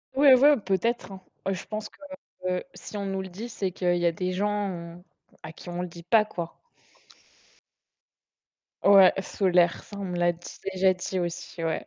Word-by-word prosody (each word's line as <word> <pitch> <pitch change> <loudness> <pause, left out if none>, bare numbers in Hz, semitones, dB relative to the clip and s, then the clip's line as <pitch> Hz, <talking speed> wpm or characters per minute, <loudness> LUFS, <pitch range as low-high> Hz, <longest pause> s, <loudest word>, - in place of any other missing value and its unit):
Oui 285 +1 +5
ouais, 285 +2 +6
peut-être 210 +3 -1
hein. 190 -1 -9 0.3
Heu, 195 - +1
je 185 - -6
pense 215 0 -5
que - - -23 0.8
si 210 - -8
on 200 - -3
nous 195 0 -2
le 190 - -7
dit, 210 +7 -7
c'est 195 -5 -3
qu'il 175 -1 0
y 175 - 0
a 170 - +4
des 180 +2 -3
gens 185 -3 -3 0.4
à 155 - -7
qui 175 - -11
on 175 0 -3
le 180 - -3
dit 170 0 -12
pas 215 +5 +4
quoi. 170 -5 -7 2.2
Ouais, 195 -2 +8
solaire. 180 -3 +2
Ça, 205 - -11
on 200 - -5
me 180 -1 -4
l'a 175 0 +3
dit 170 +1 -11 0.2
déjà 185 0 +4
dit 185 +1 -3
aussi, 175 -1 -5
ouais. 165 -1 -2
185 Hz, 185 wpm, -26 LUFS, 175-200 Hz, 2.2 s, Ouais